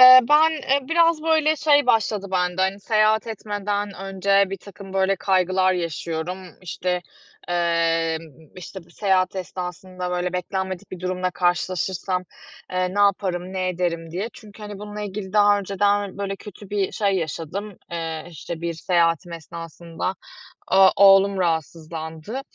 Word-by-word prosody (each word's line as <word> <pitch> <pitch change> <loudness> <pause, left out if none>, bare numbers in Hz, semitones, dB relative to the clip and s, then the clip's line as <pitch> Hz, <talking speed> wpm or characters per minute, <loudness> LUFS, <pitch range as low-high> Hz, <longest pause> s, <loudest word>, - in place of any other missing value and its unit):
Eee, 255 0 +11
ben, 310 +2 +6
eee, 280 -3 -1
biraz, 330 -1 +3
böyle, 315 -1 +3
şey 290 -3 +4
başladı 215 -4 +2
bende; 180 -1 0
hani, 190 +1 0
seyahat 215 +1 +2
etmeden 205 -2 -3
önce 195 +1 +2
birtakım, 195 0 -9
böyle, 195 0 +2
kaygılar 185 0 +2
yaşıyorum. 170 +1 -3 0.2
İşte, 180 0 -2 0.5
eee, 165 -2 +1 0.4
işte, 185 0 -9
bir 170 - -23
seyahat 190 0 +1
esnasında, 180 0 -5
böyle, 180 0 -1
beklenmedik 190 +1 -3
bir 185 - -8
durumla 185 0 -1
karşılaşırsam, 180 +1 -1 0.5
eee, 185 0 -1
ne - - -2
yaparım, 185 -2 +1
ne 185 -1 -1
ederim, 170 -2 -2
diye. 190 +7 -3
Çünkü, 215 -1 -14
hani, 205 -1 -7
bununla 210 0 -7
ilgili 200 -1 -5
daha 205 -1 +5
önceden, 200 0 0
böyle, 195 -1 -3
kötü 205 0 -12
bir 200 -2 0
şey 200 -2 +1
yaşadım, 180 +4 -4
eee, 165 -2 -4
işte, 165 +1 -7
bir 170 0 -2
seyahatim 170 +1 +1
esnasında. 165 +2 -6 0.6
O 190 0 +7
oğlum 195 0 +6
rahatsızlandı 160 - -3
190 Hz, 140 wpm, -23 LUFS, 175-205 Hz, 0.6 s, Eee